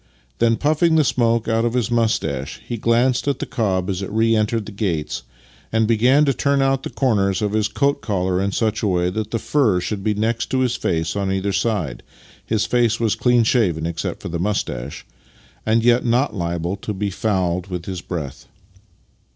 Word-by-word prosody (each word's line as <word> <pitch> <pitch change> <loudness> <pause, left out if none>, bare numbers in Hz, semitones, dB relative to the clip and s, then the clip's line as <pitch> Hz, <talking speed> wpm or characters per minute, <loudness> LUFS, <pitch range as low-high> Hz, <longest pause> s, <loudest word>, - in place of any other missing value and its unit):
Then, 115 0 +3
puffing 155 +3 +2
the 155 - +5
smoke 115 -3 +1
out 115 0 +1
of 120 +1 0
his 120 -1 0
moustache, 100 - -1
he 120 - -3
glanced 120 +4 +1
at 140 - +1
the - - -4
cob 95 -5 -1
as 95 -2 -2
it 95 - -4
re 115 +1 +2
entered 110 0 0
the 110 - -8
gates, 90 -7 -2 0.5
and 110 -1 +2
began 125 +6 +4
to 140 - +2
turn 140 +2 +1
out 135 0 +2
the - - -5
corners 105 -7 +1
of 105 - 0
his 110 -1 +2
coat 140 0 0
collar 95 -3 0
in 100 0 0
such 110 +1 0
a 105 - +1
way 90 -1 +1
that 110 +1 -3
the 115 - -1
fur 115 -7 +2
should 100 +2 -4
be 105 0 +1
next 110 +2 -1
his 130 -2 +1
face 80 -7 -1
on 100 -1 -1
either 95 +1 -1
side 95 - -1 0.4
(his 110 -2 0
face 120 -2 +2
was 115 -2 +2
clean 120 +1 +3
shaven, 95 -9 +1
except 85 -1 -4
for 85 - -5
a - - -1
moustache), 75 -10 -3 0.6
and 115 +1 +3
yet 120 +1 +4
not 125 +4 +1
liable 85 0 -2
to 105 +1 -5
be 100 +1 -2
fouled 95 -3 -1
with 90 -3 -5
his 95 -2 -5
breath. 75 -8 -6
110 Hz, 200 wpm, -21 LUFS, 95-120 Hz, 0.6 s, the